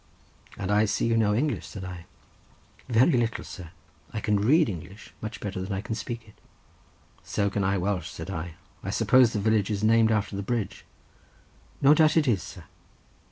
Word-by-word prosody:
"And 100 0 -3
I 105 +1 +4
see 100 - 0
you 115 0 +2
know 105 -2 +3
English," 130 - -1
said 95 - -8
I. 90 -1 -8 0.8
"Very 120 +7 +4
little, 120 -4 0
sir; 90 -5 -9 0.4
I 110 - -3
can 105 0 +1
read 145 +9 +4
English 95 +2 -8
much 110 - -6
better 95 -2 -4
than 95 +2 -5
I 95 0 -2
can 110 +1 -4
speak 115 0 -6
it." 105 - -16 0.9
"So 100 -1 -1
can 100 - -1
I 100 +1 +1
Welsh," 90 -3 -1
said 85 +3 -7
I. 85 -2 -5 0.3
"I - - -4
suppose 130 -3 +4
the 105 - -2
village 105 -1 +2
is 105 -1 -2
named 115 0 +4
after 105 -2 0
the 100 - -3
bridge." 110 0 -3 1.0
"No 140 +2 +8
doubt 155 0 +4
it 155 -3 +3
is, 105 -7 +2
sir." - - -10
105 Hz, 190 wpm, -27 LUFS, 95-115 Hz, 1.0 s, No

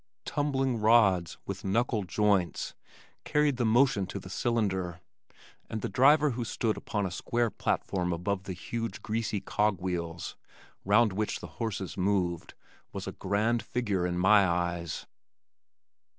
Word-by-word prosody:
"Tumbling 135 -4 0
rods" 105 -6 +4
with - - -5
"knuckle 110 +2 +1
joints" 95 0 +1 0.5
carried 150 -3 +2
the 120 - +1
motion 110 -4 +3
to 95 - -5
the 95 -1 -9
cylinder, 95 -7 -1 0.7
and 110 - -4
the - - -1
driver 145 +3 +5
who 120 0 -3
stood 115 -1 -1
upon 105 -3 -2
a 95 - -3
square 120 +4 -1
platform 90 -2 -1
above 95 +3 -2
the 95 - -4
huge, 115 +3 -5
greasy 110 -1 -1
cog 105 -3 0
wheels 85 -2 -4 0.5
(round 105 +1 +4
which 105 +2 -2
the - - -8 0.2
horses 100 -5 -3
moved) 90 -3 0 0.4
was - - -5
a - - -4
grand 110 +4 0
figure 100 -7 -1
in 90 0 -2
my 95 +2 +5
eyes. 85 -1 -2
105 Hz, 140 wpm, -29 LUFS, 90-115 Hz, 0.7 s, driver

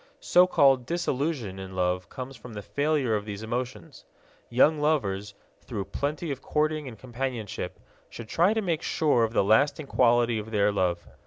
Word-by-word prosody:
So 180 +1 +5
called 135 -7 +4
disillusion 140 - -2
in 95 -1 -8
love 90 0 -1
comes 130 +1 -7
from 115 0 -11
the 105 -1 -7
failure 145 -3 0
of 105 - -2
these 105 0 -7
emotions. 120 -5 -5 0.5
Young 145 +6 +4
lovers, 105 -10 0 0.3
through 105 -6 -5
plenty 150 +3 -2
of 135 - -5
courting 155 -1 -1
and 115 -4 -9
companionship, 120 -3 -5 0.3
should 115 - -9
try 180 - +2
to 220 - 0
make 170 -4 -1
sure 150 -9 +2
of 115 0 -1
the - - +3
lasting 140 +9 +3
quality 120 -3 +3
of 105 +1 -7
their 105 -1 +2
love. 90 -3 0
125 Hz, 170 wpm, -27 LUFS, 105-150 Hz, 0.5 s, So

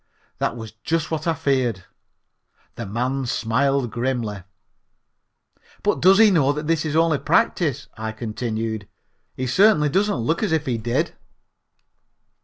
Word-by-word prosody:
That 115 - -1
was 110 -2 -8
just 165 0 -1
what 160 +1 -2
I 165 - +2
feared. 130 - 0 0.9
The - - -6
man 125 +5 -2
smiled 125 +2 0
grimly. 120 -5 -2 1.4
"But - - +1
does 190 +2 +6
he 220 -1 +7
know 145 -6 +3
that 150 +1 -5
this 160 0 0
is 155 -1 -2
only 165 -3 +3
practise?" 145 - +1
I 110 0 -4
continued. 110 -1 -4 0.5
"He 130 - -3
certainly 150 - +4
doesn't 205 +7 +1
look 125 +8 -1
as 215 - 0
if 155 -2 0
he 120 -3 -1
did." 120 +2 -1
135 Hz, 140 wpm, -22 LUFS, 115-160 Hz, 1.4 s, he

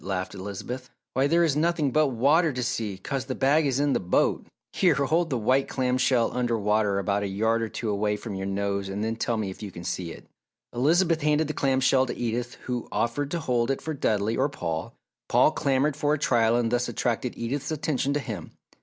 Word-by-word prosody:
laughed 95 -1 -3
Elizabeth. 105 +6 -6 0.2
"Why, 135 +2 +2
there 170 +3 +3
is 155 -4 +2
nothing 155 -2 +1
but 155 +3 +3
water 145 +7 +3
to 125 -1 -3
see, 110 -5 -2
'cause 135 +6 -4
the 130 -1 -4
bag 145 +3 +3
is 135 -1 0
in 145 -1 +2
the - - +1
boat. 90 -1 +1 0.3
Here, 175 -6 +3
hold 160 +5 +1
this 130 - 0
white 130 +5 +2
clam 130 -1 0
shell 125 -3 +2
under 120 -2 +1
water 105 -1 +1
about 100 +1 0
a 100 - -1
yard 110 +4 +1
or 115 - -2
two 115 - -5
away 105 0 0
from 110 -1 -7
your 95 0 -4
nose 100 0 -2
and 100 +2 -3
then 110 +1 -1
tell 115 0 -1
me 105 -3 -2
if - - -12
you 105 - -5
can 85 -2 -9
see 90 -1 -3
it!" - - -11 0.5
Elizabeth 160 +6 +2
handed 150 +1 +2
the 155 - -3
clam 135 -2 +1
shell 130 0 +3
to - - -5
Edith 120 +1 -2
who 125 -2 -3
offered 140 +5 -1
to 170 - -2
hold 120 -3 0
it 135 - 0
for 160 - -4
Dudley 110 -5 0
or 135 +3 +1
Paul. 80 - -4 0.3
Paul - - +5
clamoured 140 +1 +1
for 150 0 +1
a - - -4
trial 120 -6 +2
and 120 -1 +1
thus 120 0 +1
attracted 120 +1 -2
Edith's 135 +4 -3
attention 145 -3 -1
to - - +1
him. 110 - -6
125 Hz, 225 wpm, -26 LUFS, 105-140 Hz, 0.5 s, Paul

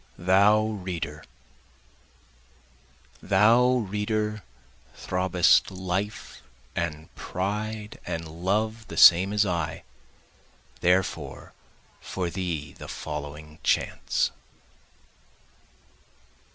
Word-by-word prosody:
Thou 100 +4 +4
Reader 90 -8 -5 2.0
Thou 110 +6 +4 0.2
reader 105 +1 -2 0.5
throbbest 90 -1 +3
life 95 +2 -4 0.3
and 80 -2 -4
pride 105 +3 -4
and 80 0 -4
love 105 +7 -2
the - - -8
same 90 +3 +8
as 105 0 +2
I, 85 -5 -2 1.0
Therefore 90 +1 0 0.5
for 90 -2 -4
thee 85 -6 -4
the - - -10
following 75 +1 -7
chants. - - 0
95 Hz, 75 wpm, -26 LUFS, 85-105 Hz, 2.0 s, same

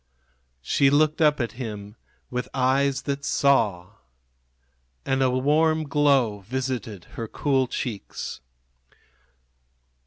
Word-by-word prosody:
She 135 - +3
looked 155 +2 +2
up 150 -2 +4
at 120 -3 -1
him 105 -3 -6 0.4
with 125 0 -3
eyes 135 +1 +2
that 140 0 -3
saw. 110 -13 +1 1.1
And 135 0 0
a 130 - +4
warm 155 +5 +2
glow 140 -8 +2
visited 120 -3 -4
her 115 - -5
cool 135 +1 0
cheeks. 110 - -5
130 Hz, 100 wpm, -25 LUFS, 115-140 Hz, 1.1 s, up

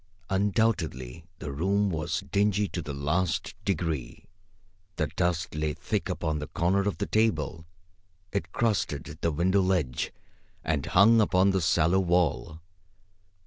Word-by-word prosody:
Undoubtedly 95 - 0
the 75 - -6
room 100 +7 +1
was 85 +4 -2
dingy 105 0 +2
to 90 - -4
the 75 - -6
last 75 +6 -1
degree. 80 -8 -2 0.7
The - - 0
dust 90 0 0
lay 75 -1 -1
thick 100 +5 -2
upon 80 -4 -1
the 75 - -5
corner 95 +5 +1
of 100 - -1
the - - -1
table. 80 -7 0 0.6
It 95 -4 -3
crusted 105 -9 -1
the 85 - +1
window 95 +6 +2
ledge 90 -9 0 0.5
and 75 -2 -1
hung 110 +7 +6
upon 100 -1 +3
the 95 -1 +1
sallow 85 +2 +3
wall. 85 -3 0
90 Hz, 135 wpm, -28 LUFS, 80-100 Hz, 0.7 s, hung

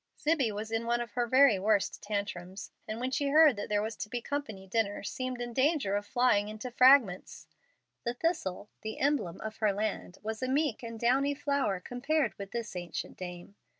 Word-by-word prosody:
Zibbie 295 -7 +1
was 215 +2 -5
in 225 +1 -1
one 240 0 +2
of 240 -2 -5
her 240 +1 -1
very 260 -4 +5
worst 205 0 +1
tantrums, 200 -2 -4 0.2
and 215 +1 -4
when 255 +2 -2
she 280 +2 0
heard 300 -1 +6
that 205 - -5
there 210 0 +1
was 220 +1 -4
to 210 - -5
be 245 - -2
company 230 -7 -5
to - - -26
dinner, 210 -3 0
seemed 255 +4 -4
in 240 -1 -4
danger 265 -6 +2
of 205 0 -2
flying 210 -4 +2
into 215 +4 -6
fragments. 250 -7 +4 0.6
The 235 0 -2
thistle, 215 - -2
the 220 0 -5
emblem 270 - 0
of 220 0 -6
her 215 -2 +2
land, 200 -2 -3
was 220 +2 -4
a 255 - -1
meek 275 -2 0
and 230 -2 -7
downy 270 +5 +2
flower 280 -9 0
compared 270 - -1
with 200 -1 -6
this 235 -3 -5
ancient 175 -1 -5
dame. 180 +1 -8
230 Hz, 200 wpm, -30 LUFS, 205-260 Hz, 0.6 s, heard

